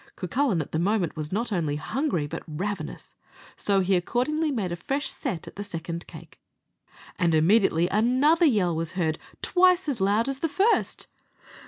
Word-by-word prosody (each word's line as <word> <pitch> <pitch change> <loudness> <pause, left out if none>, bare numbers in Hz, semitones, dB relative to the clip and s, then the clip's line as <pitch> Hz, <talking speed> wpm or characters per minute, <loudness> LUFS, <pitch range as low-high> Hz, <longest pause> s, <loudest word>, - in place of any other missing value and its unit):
Cucullin 195 - 0
at - - -16
the 160 - -1
moment 190 -2 0
was 155 -1 -5
not 225 +4 -2
only 160 -7 0
hungry, 215 - -1
but 145 - -6
ravenous, 170 +1 -5 0.4
so 200 -1 +1
he 190 +1 +2
accordingly 270 - 0
made 215 -10 -2
a - - -1
fresh 275 - -2
set 225 - -4
at - - -11
the 205 - -3
second 170 -3 -6
cake, - - -13 0.8
and 170 -3 +3
immediately 175 0 +4
another 260 - +3
yell 190 - +2
was 165 0 -3
heard 165 -4 -1 0.2
twice 365 -1 +4
as 265 -8 -2
loud 205 +5 +2
as 275 -1 -3
the 330 - -1
first. 400 +9 +1
200 Hz, 170 wpm, -26 LUFS, 170-270 Hz, 0.8 s, immediately